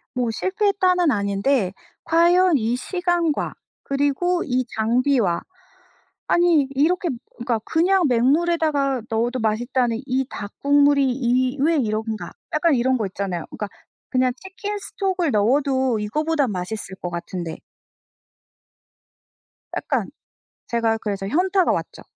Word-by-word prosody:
뭐 245 -2 0
실패했다는 375 - +1
아닌데 200 +1 0 0.3
과연 345 +1 +4
이 230 0 0
시간과 350 +1 -1 0.3
그리고 285 +6 0
이 255 -2 0
장비와 230 -4 +2 0.9
아니 340 -5 +3
이렇게 345 +6 +2 0.3
그러니까 235 -1 -1
'그냥 365 +3 +2
맹물에다가 280 +1 +2
넣어도 240 +3 0
맛있다는 230 +1 0
이 265 0 0
닭 205 0 -7
국물이 285 -1 +4
이 255 +1 +1
왜 325 +2 +3
이런가?' 220 -3 -2 0.2
약간 310 0 +3
이런 255 +1 +2
거 220 - -1
있잖아요. 185 -3 -4
그러니까 210 - -5 0.4
'그냥 255 -1 +2
치킨스톡을 385 -3 -3
넣어도 260 +2 +2
이거보단 290 +4 0
맛있을 190 +1 -5
것 175 - -3
같은데.' 170 -1 -5 2.2
약간 - - -1 0.6
제가 230 -1 +1
그래서 200 -3 -3
현타가 370 - +2
왔죠. - - -4
265 Hz, 275 characters per minute, -22 LUFS, 225-330 Hz, 2.2 s, 과연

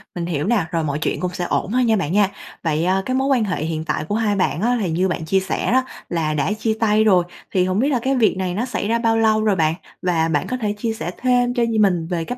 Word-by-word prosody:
Mình 170 - -3
hiểu 160 -2 -2
nà, 205 -7 +1
rồi 165 -1 0
mọi 145 -1 -2
chuyện - - -1
cũng 180 -1 -2
sẽ 180 -1 -3
ổn 190 - -1
thôi 255 +1 +2
nha 225 -2 +3
bạn 175 -6 -1
nha. 200 -1 +4 0.3
Vậy, 160 0 0
a, 190 +1 +2
cái 255 - -1
mối 265 +1 +1
quan 260 -5 +3
hệ 185 -7 -2
hiện 160 0 -3
tại 155 - -2
của 205 +6 -2
hai 215 -2 +1
bạn 185 -3 0
á, 245 +3 +2
thì 180 - -1
như 180 +4 +1
bạn 170 -3 -3
chia 190 +4 +2
sẻ 190 +4 -2
đó 260 +1 +3 0.3
là 160 -3 -1
đã 150 +6 0
chia 220 +1 -1
tay 215 -1 +3
rồi, 185 -5 +4 0.3
thì 185 -1 +2
hổng 185 +3 0
biết 275 - +2
là 260 -4 +1
cái 270 +1 +1
việc 220 -6 +2
này 185 -1 -2
nó 225 +6 -1
xảy 220 -4 -3
ra 230 +1 +1
bao 225 -1 +2
lâu 220 -1 +3
rồi 210 -2 +2
bạn? 160 -2 +2 0.3
Và 170 -3 +1
bạn 150 -3 0
có 255 - -2
thể 210 -3 -1
chia 225 +1 -2
sẻ 175 -5 -5
thêm 245 -1 +2
cho 240 - +1
nh 225 -2 +1
mình 175 -5 +2
về 170 -2 -2
cái 245 +6 -5
195 Hz, 300 wpm, -20 LUFS, 170-230 Hz, 0.3 s, nha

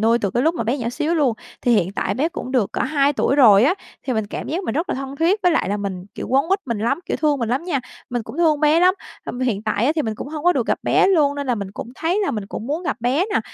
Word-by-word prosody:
nuôi 230 +2 +3
từ 200 -4 -1
cái 245 - 0
lúc 325 +3 +2
mà 230 - -2
bé 255 +5 0
nhỏ 235 -1 -2
xíu 310 +6 -1
luôn, 275 -8 +2 0.3
thì 245 - +3
hiện 190 -2 +1
tại 200 - -1
bé 300 +6 +1
cũng 255 -6 -6
được 235 -7 +1
cỡ - - -3
hai 285 -1 +2
tuổi 275 0 +1
rồi 220 -5 +7
á, 340 +7 +3 0.3
thì 255 - 0
mình 220 -2 -1
cảm - - -6
giác 355 +5 -2
mình 225 - -2
rất 330 +4 -1
là - - -1
thân 270 +1 -6
thiết 360 +7 +2
với 355 -2 +4
lại - - +1
là 205 - 0
mình 190 -3 -4
kiểu, - - -5
quấn 270 +2 +3
quýt 390 +2 +3
mình 230 -4 -2
lắm, 235 +8 0
kiểu, - - -1
thương 295 -3 +1
mình 230 -2 -2
lắm 260 +8 -1
nha. 290 -8 -1 0.3
Mình 240 -2 -2
cũng 275 - -10
thương 310 -3 +3
bé 305 +2 +4
lắm, 365 +1 +5 0.3
hâm 245 - -5
hiện 220 -5 0
tại 215 +2 0
á, 300 - +3
thì 305 - +2
mình 220 -1 -2
cũng 275 - -7
hông 305 0 -6
có 355 - +5
được - - -1
gặp - - +1
bé - - +3
luôn 300 -7 +3
nên 285 -1 -4
là 245 - +1
mình 200 -3 -5
cũng 220 - -7
thấy 345 +8 0
là - - 0
mình 210 -3 -4
cũng 220 - -6
muốn 310 +5 -2
gặp 320 - -2
bé 260 +10 +1
nè, - - +3
270 Hz, 325 wpm, -21 LUFS, 225-315 Hz, 0.3 s, rồi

